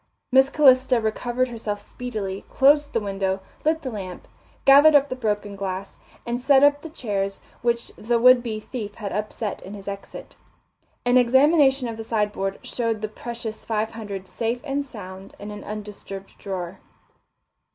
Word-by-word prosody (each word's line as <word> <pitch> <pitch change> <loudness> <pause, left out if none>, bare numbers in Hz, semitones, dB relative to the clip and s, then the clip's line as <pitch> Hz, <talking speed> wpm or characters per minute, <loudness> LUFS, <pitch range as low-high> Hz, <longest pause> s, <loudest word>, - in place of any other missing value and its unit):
Miss 265 +1 +6
Calista 260 -4 +5
recovered 240 +3 -1
herself 220 -3 -4
speedily, 205 -4 -5
closed 290 +2 +4
the 230 - +1
window, 195 -2 -1 0.2
lit 315 +1 +1
the 260 - -3
lamp, 190 -4 -7 0.4
gathered 285 +3 +8
up 285 0 +5
the 255 - -3
broken 210 -4 -2
glass, 195 0 -5 0.3
and 240 +1 -2
set 270 +1 +5
up 290 0 +5
the 325 - -8
chairs 200 - -3 0.2
which 235 0 0
the 235 +2 0
would 250 +1 +7
be 225 -3 -4
thief 215 -2 -6
had 205 -3 -5
upset 210 0 -3
in 195 +2 -8
his 200 -1 -11
exit. 200 0 -8 0.7
An 245 +1 +5
examination 265 +1 +4
of 225 -1 -5
the 225 - -5
sideboard 210 -3 -1
showed 230 -3 -2
the - - 0
precious 230 0 -7
five 220 -1 -1
hundred 200 -4 -7
safe 235 +4 -2
and 285 -1 -1
sound 190 -7 -10
in 205 +1 -8
an 210 - -8
undisturbed 205 -2 -8
drawer. 185 -2 -5
225 Hz, 160 wpm, -24 LUFS, 205-255 Hz, 0.7 s, gathered